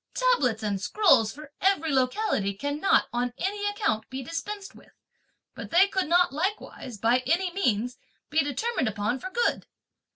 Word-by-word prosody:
Tablets 280 - +2
and 200 -2 -1
scrolls 230 - +3
for 300 0 -12
every 360 -5 +2
locality 255 - 0
cannot, 285 - +1
on 245 0 -1
any 410 +4 -2
account, 410 - -1
be 265 +1 -5
dispensed 390 +7 -6
with, - - -18 0.6
but - - -8
they 365 +4 +5
could 380 -3 -1
not 350 -2 +3
likewise, 320 - -4
by 230 +4 +3
any 355 +5 +1
means, 250 - -1 0.3
be 310 +1 +3
determined 290 - -1
upon 210 +4 -1
for 375 - -6
good! 475 +5 0
300 Hz, 155 wpm, -27 LUFS, 245-390 Hz, 0.6 s, they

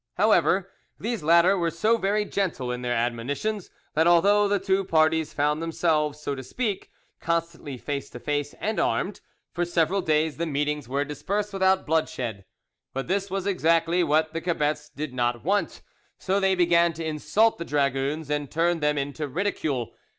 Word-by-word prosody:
However, - - +3 0.3
these 230 -4 -3
latter 170 +5 +5
were 170 -3 0
so 190 +8 +2
very 210 -1 0
gentle 165 -12 -2
in 125 0 -4
their 120 -1 -1
admonitions, 130 - -2 0.2
that 160 +2 +3
although 200 +4 +5
the 205 0 +2
two 195 0 +1
parties 160 -2 +2
found 150 +2 0
themselves, 155 -3 0
so 145 -1 -3
to 135 - -5
speak, 210 - -3 0.3
constantly 165 -5 -2
face 140 +2 -4
to 120 - -9
face 145 +1 -2
and 220 0 -1
armed, 200 +1 -1 0.3
for 175 - -1
several 175 +2 +1
days 155 -2 +1
the 170 +1 -2
meetings 150 -2 -2
were 140 +2 0
dispersed 200 +8 -3
without 190 0 +2
bloodshed. 130 -10 -1 0.5
But 135 0 -3
this 195 +2 -1
was 195 0 -3
exactly 170 -2 +2
what 155 0 +1
the 165 - -3
cebets 150 -3 -1
did 150 -2 -6
not 120 -1 -1
want, 195 -2 0 0.3
so 195 +1 0
they 190 -1 +2
began 170 -1 +3
to 165 +1 -6
insult 185 +9 +1
the - - -2
dragoons 140 +1 -1
and 145 -2 -1
turn 170 +1 +1
them 150 -1 +1
into 145 +2 -3
ridicule. 145 - -2
160 Hz, 170 wpm, -25 LUFS, 145-190 Hz, 0.5 s, latter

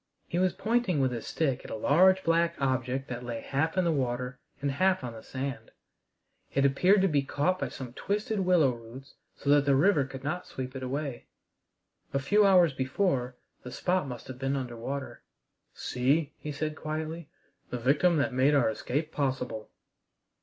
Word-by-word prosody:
He 175 - -1
was 185 -1 +2
pointing 205 -3 +1
with 130 -2 +2
his 120 -2 -5
stick 140 -6 -1
at - - -10
a - - -4
large 185 +11 +4
black 170 0 +2
object 130 0 -1
that 125 0 -5
lay 120 -2 -4
half 160 +8 -1
in 185 - +3
the 170 - +3
water 125 -2 -2 0.2
and 140 0 -1
half 185 +3 +2
on 120 -2 -5
the 110 - -10
sand. 135 +2 -5 0.9
It 140 0 +3
appeared 185 +9 +4
to - - +5
be 145 -5 +2
caught 160 +7 0
by - - -2
some 125 -3 -8
twisted 210 - -2
willow 180 -7 +4
roots 120 +4 -11 0.2
so 140 - 0
that 145 -1 +5
the 140 -1 +4
river 155 +1 +4
could 135 0 -9
not 165 +5 -3
sweep 130 0 -6
it 130 - -5
away. 135 0 -4 0.9
A - - +3
few 205 +9 +4
hours 180 -6 +5
before 130 -1 0 0.3
the 125 - -8
spot 180 +1 0
must 125 -2 -7
have 130 -1 -8
been 135 +1 0
under 125 -3 -4
water. 130 +4 -5 0.5
"See," 140 +4 0
he 150 - -5
said 155 +2 -3
quietly, 155 +1 -5 0.4
"the 125 - -3
victim 150 +8 +3
that 140 -2 +1
made 135 +3 +4
our 125 -5 +3
escape 150 +8 -3
possible!" 125 -6 -2
140 Hz, 185 wpm, -29 LUFS, 130-170 Hz, 0.9 s, to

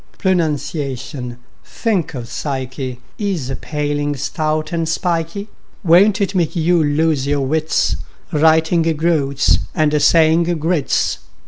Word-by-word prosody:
Pronunciation—think 145 - -2
of 120 -2 -6
psyche!— 130 -1 -4 0.2
Is 185 - -2
a - - -2
paling, 145 0 -2
stout 155 +2 -2
and 165 -2 -1
spikey; 170 +3 -2 0.4
Won't 190 +5 +5
it 200 -1 0
make 175 -4 0
you 170 0 +2
lose 145 -1 +1
your 140 -1 0
wits, 155 +3 0 0.3
Writing 160 +2 +3 0.2
"groats" 145 -4 +2 0.2
and 150 -3 +2
saying 160 +2 +4
groats? 160 -2 0
155 Hz, 110 wpm, -18 LUFS, 140-170 Hz, 0.4 s, Won't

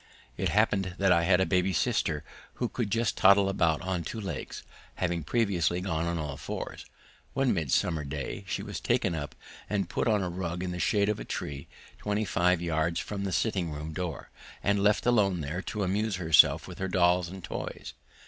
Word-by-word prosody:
It - - -1
happened 100 -4 +1
that 95 -1 +3
I 85 -1 +4
had 90 0 +4
a 95 - +3
baby 95 0 +1
sister - - 0 0.3
who 125 - -1
could 115 -2 -3
just 115 +2 +1
toddle 100 +1 +6
about 85 -5 +1
on 90 -2 -2
two 115 - -5
legs, 85 -10 -5 0.3
having 85 -3 -1
previously 90 -2 +1
gone 85 -3 -1
on 85 0 -1
all 75 -3 -4
fours. - - -6 0.5
One 135 -2 +2
midsummer 80 -1 0
day 70 - -5
she - - -2
was - - -5
taken - - +1
up 75 -3 -5 0.3
and 100 -3 -1
put - - -1
on 105 -3 +2
a - - -1
rug 90 0 -3
in 90 - -3
the 90 - -4
shade 100 +2 +2
of 105 - 0
a - - -5
tree, 70 -1 -5 0.3
twenty 105 +1 -1
five 90 -2 +2
yards 85 +1 0
from 100 -1 -4
the 95 - -2
sitting 95 -3 0
room 75 +1 -6
door, 90 +1 -5 0.3
and 100 0 +2
left 105 +1 +3
alone 100 -8 +3
there 75 +5 -3
to 105 0 -3
amuse 100 +3 0
herself 80 -4 +5
with - - -9
her 95 - -1
dolls 90 -1 +3
and 95 0 -9
toys. - - -6
90 Hz, 195 wpm, -29 LUFS, 85-100 Hz, 0.5 s, toddle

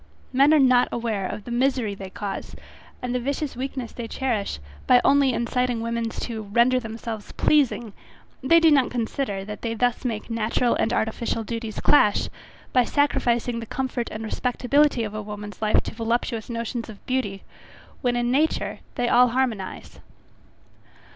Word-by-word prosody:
Men 275 +3 +5
are 315 - +6
not 255 -3 +5
aware 220 -5 -2
of 210 +2 -6
the 240 - -8
misery 250 -3 +1
they 195 -1 -8
cause, 195 +1 -6 0.5
and 250 0 -2
the 250 - +1
vicious 280 +2 -3
weakness 260 -1 -4
they 235 -2 -6
cherish, 230 - -2 0.3
by 250 - +7
only 280 -1 +5
inciting 245 0 0
women 230 0 -2
to 225 0 -5
render 235 +5 +3
themselves 225 -2 -6
pleasing; 250 -7 +2 0.5
they 330 +6 +5
do 325 -1 +5
not 270 -4 +4
consider, 225 -4 -2
that 210 0 -7
they 230 -1 -2
thus 245 +3 0
make 225 -4 -3
natural 230 +2 +1
and 225 - 0
artificial 225 0 -1
duties 225 -1 -5
clash, 210 -8 +4 0.4
by 250 - +5
sacrificing 245 -4 +1
the 230 - -7
comfort 255 -2 -3
and 215 +1 -6
respectability 250 +3 +1
of 210 -1 -4
a 215 - -4
woman's 210 0 -8
life 215 -1 +3
to - - -6
voluptuous 230 0 -2
notions 235 0 -4
of 210 -2 -12
beauty, 245 -7 -2 0.6
when 245 -2 +1
in 240 0 0
nature 300 +5 +1 0.2
they 245 - 0
all 250 +1 +6
harmonize. 235 -6 -2
235 Hz, 160 wpm, -24 LUFS, 220-255 Hz, 0.6 s, by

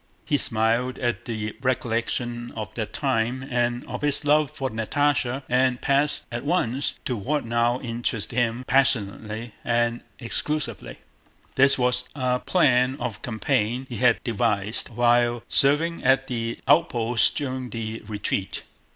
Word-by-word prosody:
He 145 - +1
smiled 115 +2 +1
at 120 -1 -2
the 110 -2 -4
recollection 120 -1 -2
of 110 -1 -6
that 110 -2 -4
time 130 0 -1
and 120 0 0
of - - -6
his 145 0 +2
love 150 0 +3
for 145 -3 -4
Natásha, 130 +3 0
and 125 0 +2
passed 140 +1 +1
at 120 0 -4
once 140 -5 0
to 125 - -1
what 140 +6 -2
now 120 +1 +1
interested 115 -2 -3
him 120 0 0
passionately 115 -4 0
and 120 0 0 0.2
exclusively. 120 -2 -3 0.6
This 135 +1 +5
was 125 0 +1
a 125 -2 0
plan 130 -6 +2
of 120 -5 -4
campaign 120 +1 -1
he 120 - -5
had 125 0 +4
devised 110 -3 0
while 120 0 +2
serving 160 +5 +4
at 135 0 +3
the 115 -2 -3
outposts 125 -6 +3
during 130 -3 -4
the 115 -1 -5
retreat. 100 -2 -3
120 Hz, 135 wpm, -24 LUFS, 115-135 Hz, 0.6 s, This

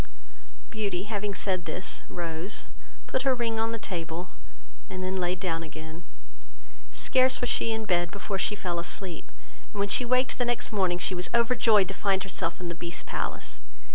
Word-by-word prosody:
Beauty 200 -5 -1
having 205 -1 -2
said 185 -2 0
this, 185 - -2
rose, 170 +3 -3 0.4
put 260 - 0
her 265 -1 +3
ring 230 -2 0
on 225 0 +1
the 230 - -1
table, 175 -3 -4 0.6
and 185 0 -4
then 185 +1 -1
laid 180 +1 +1
down 165 -4 0
again; 160 +1 -8 0.9
scarce 255 - +5
was 245 - +1
she 230 - +2
in 220 0 -1
bed 175 -3 +2
before 200 +1 -3
she 210 - +2
fell 175 -4 -2
asleep; 175 0 -4 0.4
and 205 - -6
when 200 0 +2
she 250 - +4
waked 255 +2 +2
the 245 - +3
next 240 0 0
morning, 185 -4 +2
she 180 - +1
was 180 0 -1
overjoyed 230 -4 +5
to 195 - -3
find 195 -1 +2
herself 175 -3 0
in 180 - -4
the 170 - -2
Beast's 170 0 -4
palace. - - -3
190 Hz, 180 wpm, -29 LUFS, 175-220 Hz, 0.9 s, scarce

